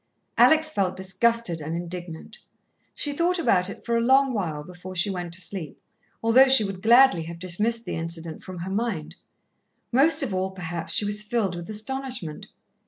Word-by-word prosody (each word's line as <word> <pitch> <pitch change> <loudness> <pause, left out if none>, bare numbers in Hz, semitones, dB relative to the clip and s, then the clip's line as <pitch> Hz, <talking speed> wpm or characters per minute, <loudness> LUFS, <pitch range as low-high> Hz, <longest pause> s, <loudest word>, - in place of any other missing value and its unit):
Alex 315 0 +5
felt 190 -7 -1
disgusted 190 -1 0
and 155 +2 -4
indignant. 175 -1 -7 0.6
She 290 - -1
thought 345 +4 +1
about 185 - +2
it - - -10
for 235 - 0
a 230 - +2
long 265 +2 +4
while 160 -8 -3
before 180 +2 -10
she 180 +3 +1
went 175 -2 -5
to 185 - -4
sleep, 170 -4 -5 0.4
although 245 +4 +6
she 265 -4 +7
would 195 -2 -5
gladly 240 -3 +6
have 170 +1 -8
dismissed 210 +7 -1
the - - -4
incident 165 -1 -6
from 185 -1 -9
her 180 +3 -5
mind. 200 -7 -3 0.8
Most 285 +5 +4
of 235 -8 -3
all, 185 0 -1
perhaps, 175 -3 -6
she 210 - +3
was 205 +1 0
filled 210 -4 -1
with 175 +2 -8
astonishment. 230 - -5
190 Hz, 175 wpm, -25 LUFS, 175-235 Hz, 0.8 s, she